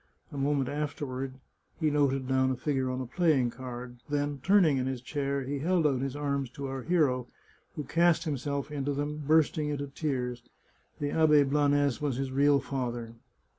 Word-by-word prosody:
A - - -9
moment 140 -1 +1
afterward 140 -3 -3 0.5
he 155 -3 +2
noted 135 -3 +1
down 130 0 +2
a 130 - 0
figure 130 0 -1
on 130 0 -2
a - - -3
playing 135 -3 +2
card; 125 -1 -8
then, 145 -1 -1
turning 180 -6 +4
in 130 0 -1
his 130 -1 -2
chair, 140 +1 -2
he 140 +2 -3
held 170 +2 +1
out 135 -4 +2
his 135 0 -3
arms 140 -3 -1
to 140 - -6
our 135 -1 -4
hero, 135 -7 +1 0.5
who 150 - -3
cast 170 +3 +3
himself 140 -1 -3
into 145 -1 -2
them, 145 +2 -3
bursting 155 -1 +3
into 145 -1 -2
tears. 130 -4 -3 0.6
The 145 -1 -1
Abbe 150 -2 +5
Blanes 145 -1 +2
was 145 -4 0
his 135 -1 -2
real 140 +1 +4
father. 120 -4 -4
140 Hz, 175 wpm, -29 LUFS, 130-150 Hz, 0.6 s, Abbe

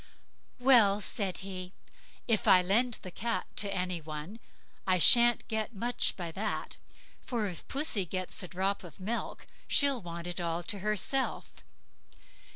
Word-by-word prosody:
"Well!" 235 -6 +5
said 195 -3 -2
he, 185 -1 -7 0.5
"if 225 -3 0
I 180 -1 +7
lend 230 +6 +2
the 185 - -8
cat 230 +5 -2
to 200 -1 +1
any 180 -3 -2
one 155 +7 -8 0.5
I 185 -1 +3
shan't 235 +8 +7
get 220 +1 -3
much 240 +5 -1
by 175 -3 -5
that; 210 +5 -4 0.4
for 235 -4 -3
if 180 -4 -7
pussy 270 - 0
gets 185 +1 -4
a 180 - -6
drop 190 +3 -2
of 175 -2 -13
milk, 220 +5 -4 0.2
she'll 280 -4 +3
want 170 -1 -7
it 175 0 -5
all 170 0 -2
herself. 210 +6 -2
195 Hz, 145 wpm, -30 LUFS, 180-230 Hz, 0.5 s, I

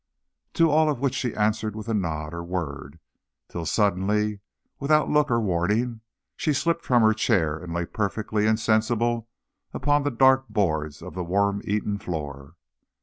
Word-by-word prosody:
To 165 -2 +3
all 155 +1 +4
of 145 -5 -1
which 135 -1 0
she 125 -3 -2
answered 110 0 0
with 110 +1 -7
a 115 - -1
nod 80 -6 -2
or 85 0 -5
word, 80 -4 -5 0.5
till 85 -2 -5
suddenly, 105 +1 +1 0.4
without 150 +2 +2
look 150 -1 +3
or 115 -1 +2
warning, 105 +5 0 0.3
she 155 - 0
slipped 170 +4 0
from 120 -3 +3
her 110 0 +5
chair 80 -7 +1
and 85 0 -8
lay 85 0 -1
perfectly 105 +2 -1
insensible 115 +1 +1 0.5
upon 145 0 +2
the 145 - 0
dark 130 +1 +4
boards 80 -6 -1
of 90 - -8
the 90 - -3
worm 100 +3 +1
eaten 105 0 -1
floor. 75 -5 -6
105 Hz, 160 wpm, -25 LUFS, 85-120 Hz, 0.5 s, her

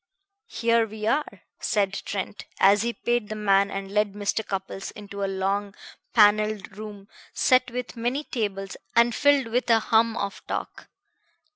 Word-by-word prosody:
"Here 230 - +2
we 215 0 -6
are," 295 +7 -1 0.2
said 200 -2 0
Trent 200 0 -5
as 200 +1 +5
he 235 +1 0
paid 240 -2 -1
the 215 - -4
man 200 -1 +3
and 195 -1 -5
led 210 -1 +1
Mr. 205 +2 -1
Cupples 195 -1 -5
into 200 -1 -7
a - - +1
long 195 +1 -1 0.4
paneled 210 -2 +3
room 205 -2 -9 0.3
set 255 -1 +3
with 250 +1 -5
many 245 +5 -1
tables 195 -7 -3 0.2
and 235 0 +5
filled 285 0 +4
with 245 +2 0
a 230 - +6
hum 225 +1 +2
of 200 -1 -4
talk. - - -5
210 Hz, 155 wpm, -25 LUFS, 200-230 Hz, 0.4 s, a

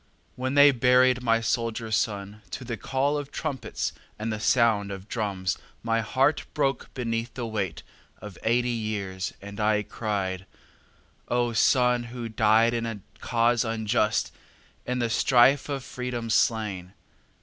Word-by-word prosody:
When 130 +2 -2
they 145 0 +8
buried 125 0 +4
my 115 -2 +2
soldier 115 0 -2
son 105 -1 -1
To 130 - -6
the 120 -1 -3
call 135 +6 0
of 145 -1 -7
trumpets 145 -5 -3 0.2
and 110 +1 -3
the 105 - -4
sound 110 -3 +2
of 95 0 -8
drums 100 -6 -2 0.2
My 115 0 +1
heart 135 +7 +1
broke 135 -4 0
beneath 115 -1 -3
the 120 - -3
weight 100 -8 -3 0.3
Of 105 -3 -10
eighty 120 +2 +1
years, 105 -5 -3
and 100 +1 -8
I 105 0 +2
cried: 95 -4 -3 0.8
"Oh, 120 -1 0
son 125 0 +3
who 120 -1 -6
died 110 +1 +3
in 115 -1 -1
a 110 -3 -5 0.2
cause 120 +1 +2
unjust! 110 -1 0 0.5
In 125 0 -1
the 120 -1 +1
strife 130 +4 +4
of 140 -2 -3
Freedom 125 -3 -4
slain!" 100 -5 0
115 Hz, 145 wpm, -26 LUFS, 105-125 Hz, 0.8 s, they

